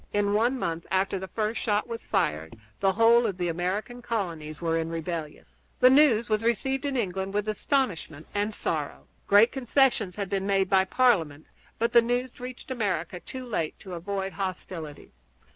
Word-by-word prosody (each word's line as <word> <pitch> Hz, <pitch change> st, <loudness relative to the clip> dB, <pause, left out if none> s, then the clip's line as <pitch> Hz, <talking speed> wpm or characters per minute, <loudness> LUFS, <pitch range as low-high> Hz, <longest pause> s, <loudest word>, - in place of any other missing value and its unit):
In 205 Hz, 0 st, +1 dB
one 235 Hz, +5 st, +2 dB
month 165 Hz, -7 st, -3 dB
after 190 Hz, 0 st, +1 dB
the 190 Hz, -, -6 dB
first 215 Hz, +4 st, -2 dB
shot 210 Hz, 0 st, 0 dB
was 230 Hz, -1 st, -6 dB
fired 95 Hz, -, -1 dB, 0.2 s
the 195 Hz, -1 st, +2 dB
whole 230 Hz, +3 st, +5 dB
of 195 Hz, -4 st, -3 dB
the 175 Hz, -2 st, -1 dB
American 190 Hz, +8 st, -3 dB
colonies 165 Hz, -10 st, -4 dB
were 165 Hz, -1 st, 0 dB
in 165 Hz, 0 st, -1 dB
rebellion. 165 Hz, -2 st, -5 dB, 0.3 s
The 255 Hz, -, +7 dB
news 265 Hz, -5 st, +5 dB
was 215 Hz, -1 st, +1 dB
received 250 Hz, +4 st, 0 dB
in 275 Hz, -2 st, -1 dB
England 195 Hz, -2 st, -2 dB
with 210 Hz, 0 st, 0 dB
astonishment 210 Hz, -, -1 dB
and 205 Hz, +1 st, 0 dB
sorrow. -, -, -3 dB, 0.2 s
Great 205 Hz, +4 st, +6 dB
concessions 250 Hz, -7 st, +2 dB
had 200 Hz, -2 st, -3 dB
been 195 Hz, +1 st, -2 dB
made 195 Hz, -1 st, +1 dB
by 190 Hz, -1 st, +5 dB
Parliament, 180 Hz, -, +2 dB, 0.3 s
but 230 Hz, +1 st, 0 dB
the 235 Hz, -, +8 dB
news 245 Hz, +2 st, -1 dB
had -, -, -21 dB
reached 255 Hz, +1 st, -8 dB
America 185 Hz, -7 st, -2 dB
too 260 Hz, +7 st, -7 dB
late 170 Hz, -10 st, -2 dB
to 190 Hz, -, -8 dB
avoid 195 Hz, +2 st, -3 dB
hostilities. 180 Hz, -5 st, -6 dB
200 Hz, 175 wpm, -27 LUFS, 175-235 Hz, 0.3 s, the